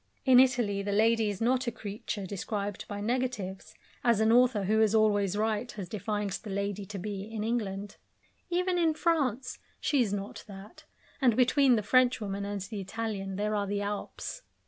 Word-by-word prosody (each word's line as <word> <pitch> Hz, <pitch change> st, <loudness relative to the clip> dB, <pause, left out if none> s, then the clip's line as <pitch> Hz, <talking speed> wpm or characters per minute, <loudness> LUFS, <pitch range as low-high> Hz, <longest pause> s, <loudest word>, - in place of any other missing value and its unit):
In 255 Hz, -2 st, +7 dB
Italy 240 Hz, -6 st, +3 dB
the 200 Hz, +1 st, -3 dB
lady 220 Hz, +1 st, +3 dB
is 200 Hz, -2 st, -4 dB
not 255 Hz, +2 st, +1 dB
a -, -, +1 dB
creature 205 Hz, -2 st, -5 dB
described 200 Hz, +1 st, -4 dB
by 205 Hz, -1 st, -5 dB
negatives, 220 Hz, -5 st, -3 dB, 0.3 s
as 235 Hz, -3 st, +3 dB
an 220 Hz, 0 st, +4 dB
author 240 Hz, -3 st, +4 dB
who 215 Hz, +3 st, +2 dB
is 220 Hz, 0 st, +3 dB
always 205 Hz, -3 st, +3 dB
right 220 Hz, +2 st, -1 dB
has 195 Hz, -4 st, -6 dB
defined 210 Hz, +1 st, -3 dB
the 215 Hz, -, -8 dB
lady 200 Hz, 0 st, -3 dB
to 205 Hz, -, -6 dB
be 195 Hz, +1 st, -4 dB
in 215 Hz, +1 st, -5 dB
England. 205 Hz, -3 st, -3 dB, 0.5 s
Even 360 Hz, 0 st, +1 dB
in 325 Hz, -2 st, +2 dB
France 270 Hz, -7 st, 0 dB, 0.2 s
she 285 Hz, -3 st, +2 dB
is 220 Hz, -5 st, +1 dB
not 200 Hz, 0 st, -5 dB
that, 200 Hz, +1 st, -12 dB, 0.4 s
and 245 Hz, -4 st, +4 dB
between 260 Hz, +1 st, +4 dB
the 215 Hz, -, 0 dB
Frenchwoman 210 Hz, -4 st, +2 dB
and 200 Hz, -1 st, -4 dB
the 200 Hz, +1 st, -5 dB
Italian 195 Hz, -1 st, -4 dB
there 210 Hz, +2 st, -1 dB
are 205 Hz, -1 st, 0 dB
the 200 Hz, +1 st, -1 dB
Alps. 205 Hz, -, -5 dB
210 Hz, 180 wpm, -29 LUFS, 200-245 Hz, 0.5 s, In